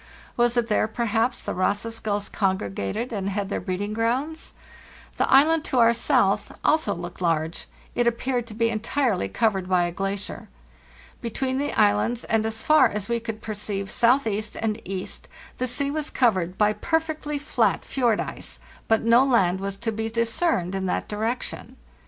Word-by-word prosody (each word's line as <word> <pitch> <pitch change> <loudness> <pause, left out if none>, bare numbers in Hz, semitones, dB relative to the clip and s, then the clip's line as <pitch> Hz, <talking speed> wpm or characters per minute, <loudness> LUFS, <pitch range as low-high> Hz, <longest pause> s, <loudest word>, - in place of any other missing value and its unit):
Was 240 0 +2
it 235 -1 +2
there, 215 -1 +2
perhaps, 230 +2 0
the - - -4
Ross's 205 +5 -1
gulls 205 -2 -2
congregated 190 - -2
and 200 -2 -2
had 200 0 -2
their - - -1
breeding 205 +2 -3
grounds? 255 +8 -1 0.6
The - - +1
island 310 +4 +5
to 260 - -1
our 235 -1 +6
south 235 - +2
also 315 +1 +2
looked 175 +1 -8
large; 165 -1 -1 0.3
it 240 0 +1
appeared 240 0 0
to 215 - -9
be 230 0 +1
entirely 225 - 0
covered 195 - 0
by 180 -1 +3
a 175 - -1
elacier.* 195 +2 -4 0.7
Between 260 +3 -2
the 290 - -1
islands, 105 - +2
and 220 0 +1
as 220 0 -3
far 310 -2 +6
as 210 +1 -4
we 235 0 +1
could 225 -1 -6
perceive 205 -2 -3
southeast 225 -4 +2
and 220 0 -1
east, 190 0 -5 0.3
the 255 - 0
sea 280 +3 -1
was 305 0 -2
covered 185 -8 +1
by 210 0 +3
per 320 +10 +1
fectly 310 -2 -4
flat 290 - +1
fjord 240 -5 +1
ice, - - -5 0.3
but 225 0 +3
no 230 +3 +6
land 190 -9 +3
was 195 0 -4
to 225 +2 -2
be 220 +1 -3
discerned 230 - 0
in 190 -1 -2
that - - -1
direction. 220 +4 -3
225 Hz, 170 wpm, -25 LUFS, 195-245 Hz, 0.7 s, our